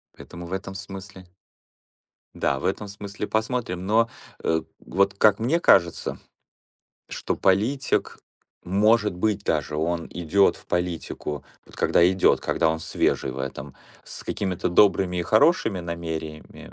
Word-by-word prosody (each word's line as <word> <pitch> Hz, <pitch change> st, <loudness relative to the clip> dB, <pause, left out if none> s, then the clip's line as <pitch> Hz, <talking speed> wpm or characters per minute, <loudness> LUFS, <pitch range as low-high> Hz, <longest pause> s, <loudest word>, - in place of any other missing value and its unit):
Поэтому 85 Hz, 0 st, -10 dB
в 90 Hz, -, -7 dB
этом 95 Hz, 0 st, -5 dB
смысле 95 Hz, -1 st, -9 dB, 1.1 s
да, 70 Hz, -, 0 dB
в -, -, -6 dB
этом 100 Hz, +2 st, -1 dB
смысле 100 Hz, +1 st, -6 dB
посмотрим, 110 Hz, -5 st, -2 dB
но, 115 Hz, +3 st, +3 dB, 0.3 s
э, 80 Hz, 0 st, +1 dB, 0.2 s
вот 100 Hz, +2 st, +2 dB
как 105 Hz, 0 st, +5 dB
мне 130 Hz, +10 st, +1 dB
кажется, 85 Hz, -3 st, +3 dB, 0.9 s
что -, -, -3 dB
политик 110 Hz, +9 st, +1 dB, 0.5 s
может 105 Hz, +2 st, +3 dB
быть, 100 Hz, +2 st, -1 dB
даже 75 Hz, -1 st, -1 dB
он 85 Hz, +2 st, -1 dB
идет 90 Hz, +3 st, +2 dB
в -, -, -16 dB
политику- 85 Hz, -5 st, -3 dB, 0.2 s
вот -, -, -16 dB
когда 85 Hz, -, +4 dB
идет, 95 Hz, 0 st, +3 dB
когда 80 Hz, -, +1 dB
он 80 Hz, 0 st, -3 dB
свежий 80 Hz, -3 st, 0 dB
в 65 Hz, -, -7 dB
этом- 65 Hz, +1 st, -6 dB, 0.3 s
с -, -, -10 dB
какими-то 95 Hz, -4 st, -2 dB
добрыми 90 Hz, -1 st, +3 dB
и -, -, 0 dB
хорошими 110 Hz, -, +3 dB
намерениями, 80 Hz, -2 st, -6 dB
95 Hz, 135 wpm, -24 LUFS, 85-105 Hz, 1.1 s, как